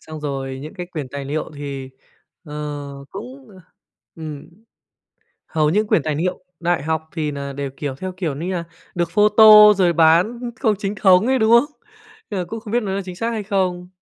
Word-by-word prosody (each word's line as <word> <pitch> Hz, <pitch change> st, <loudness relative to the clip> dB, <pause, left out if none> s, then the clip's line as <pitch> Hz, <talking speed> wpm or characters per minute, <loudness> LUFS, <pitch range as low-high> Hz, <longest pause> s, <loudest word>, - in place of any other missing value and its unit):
xong 155 Hz, -1 st, -9 dB
rồi 135 Hz, -2 st, -4 dB
những 155 Hz, +6 st, -9 dB
cái 180 Hz, -2 st, -6 dB
quyền 155 Hz, -6 st, -6 dB
tài 140 Hz, +1 st, -6 dB
liệu 150 Hz, +4 st, -3 dB
thì, 140 Hz, -2 st, -6 dB, 0.5 s
ờ, 150 Hz, -3 st, -9 dB, 0.6 s
cũng, 255 Hz, +5 st, -9 dB, 0.7 s
ừm, 155 Hz, -1 st, -8 dB, 1.0 s
hầu 155 Hz, -2 st, +1 dB
như 205 Hz, +7 st, +2 dB
quyền 190 Hz, -7 st, +1 dB
tài 155 Hz, -2 st, -1 dB
niệu 180 Hz, +4 st, -2 dB, 0.2 s
đại 175 Hz, -4 st, 0 dB
học 160 Hz, 0 st, -2 dB
thì 155 Hz, -3 st, -1 dB
nà 140 Hz, -1 st, -5 dB
đều, 140 Hz, 0 st, -4 dB
kiểu, 140 Hz, -3 st, -4 dB
theo 185 Hz, +6 st, -5 dB
kiểu 160 Hz, -7 st, -2 dB
như 175 Hz, +5 st, -3 dB
là 170 Hz, -2 st, -2 dB, 0.3 s
được 170 Hz, -1 st, -1 dB
photo 210 Hz, +1 st, +8 dB
rồi 180 Hz, -3 st, +2 dB
bán 170 Hz, +8 st, +4 dB, 0.2 s
không 215 Hz, -2 st, +2 dB
chính 200 Hz, 0 st, -3 dB
thống 190 Hz, +2 st, +4 dB
ấy, 265 Hz, 0 st, +2 dB
đúng 220 Hz, 0 st, +3 dB
không? 270 Hz, +6 st, +4 dB, 0.5 s
Nên 200 Hz, -, -2 dB
là 180 Hz, -, -2 dB
cũng 225 Hz, +5 st, -6 dB
không 215 Hz, 0 st, -9 dB
biết 240 Hz, -, +2 dB
nó 195 Hz, -, -3 dB
là 200 Hz, -, -2 dB
chính 180 Hz, -, -7 dB
xác 230 Hz, +5 st, -2 dB
hay 220 Hz, -2 st, -3 dB
không. 185 Hz, -3 st, -1 dB
175 Hz, 200 wpm, -20 LUFS, 150-210 Hz, 1.0 s, photo